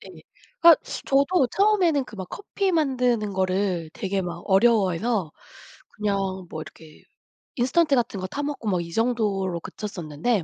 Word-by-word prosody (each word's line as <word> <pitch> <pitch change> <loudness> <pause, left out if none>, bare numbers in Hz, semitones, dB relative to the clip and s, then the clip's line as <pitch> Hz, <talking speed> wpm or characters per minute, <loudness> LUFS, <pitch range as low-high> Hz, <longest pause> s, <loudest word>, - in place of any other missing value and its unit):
네. - - -12 0.5
그니까 335 -1 +8 0.2
저도 275 +2 +3
처음에는 375 -9 +3
그 215 - -12
막 185 -1 -6
커피 395 -1 -2
만드는 250 - +1
거를 185 -3 -1
되게 195 0 -2
막 175 -1 -6
어려워해서 195 -3 +2 0.7
그냥 205 -1 0 0.3
뭐 155 - -6
이렇게 155 0 -14 0.5
인스턴트 280 +4 +2
같은 230 -5 -1
것 185 - -4
타 290 - -4
먹고 285 -6 -4
막 180 -2 +1
이 170 0 -8
정도로 205 -7 0
그쳤었는데 180 +1 -3
210 Hz, 305 characters per minute, -24 LUFS, 185-270 Hz, 0.7 s, 그니까